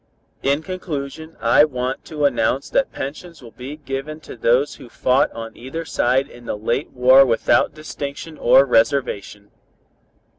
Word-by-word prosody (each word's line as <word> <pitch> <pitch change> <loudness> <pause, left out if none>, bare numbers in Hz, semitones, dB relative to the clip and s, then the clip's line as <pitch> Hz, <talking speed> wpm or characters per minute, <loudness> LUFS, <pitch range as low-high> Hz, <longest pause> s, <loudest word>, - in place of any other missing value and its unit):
"In 140 +3 +1
conclusion 160 -3 -6
I 115 +5 +5
want 130 -3 -2
to 150 -2 -2
announce 130 0 0
that 275 - +1
pensions 155 +2 -7
will 115 - -12
be 130 +5 -8
given 145 +1 -5
to - - -10
those 120 +4 +2
who 130 -4 -13
fought 130 +4 +2
on 115 0 -8
either 135 +7 -6
side 130 -2 +1
in 120 0 -15
the 105 - -3
late 120 +6 -2
war 130 +2 +6
without 125 +4 +2
distinction 155 +1 -7
or 135 - +6
reservation. 115 -5 0
135 Hz, 150 wpm, -21 LUFS, 125-150 Hz, -, war